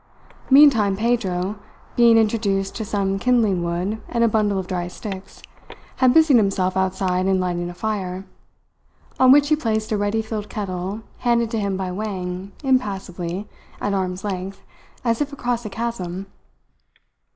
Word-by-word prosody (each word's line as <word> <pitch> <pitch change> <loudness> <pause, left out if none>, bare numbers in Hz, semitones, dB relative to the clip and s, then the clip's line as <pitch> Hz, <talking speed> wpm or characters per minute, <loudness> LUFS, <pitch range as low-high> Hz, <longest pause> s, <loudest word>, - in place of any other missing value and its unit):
Meantime 255 -9 +6
Pedro, 205 -4 -1 0.4
being 235 -1 +6
introduced 210 -3 +1
to 220 - -3
some 195 -2 -1
kindling 220 -6 +2
wood 180 +6 -2
and 235 -1 +1
a - - +5
bundle 210 -2 +1
of 190 - -2
dry 175 -1 -3
sticks, 190 +1 -8 0.5
had 255 -1 +5
busied 315 -2 +6
himself 195 -3 +1
outside 185 -1 0
in 190 -1 +2
lighting 175 -1 -2
a - - -7
fire, 190 -2 -3 0.9
on 260 0 +7
which 290 +1 +6
he 305 - +5
placed 220 -7 -2
a 215 - +1
ready 205 +2 0
filled 215 -1 -5
kettle 195 0 -4 0.2
handed 235 -2 +1
to 225 - -1
him 200 -2 -1
by 190 -1 -3
Wang 185 -1 -4
impassively, 195 -7 -1 0.3
at 205 - -1
arm's 185 -1 -2
length, 195 -1 -5 0.4
as 230 +1 +1
if 295 0 -1
across 245 -4 -2
a - - -6
chasm. 195 -4 -4
205 Hz, 150 wpm, -22 LUFS, 185-230 Hz, 0.9 s, on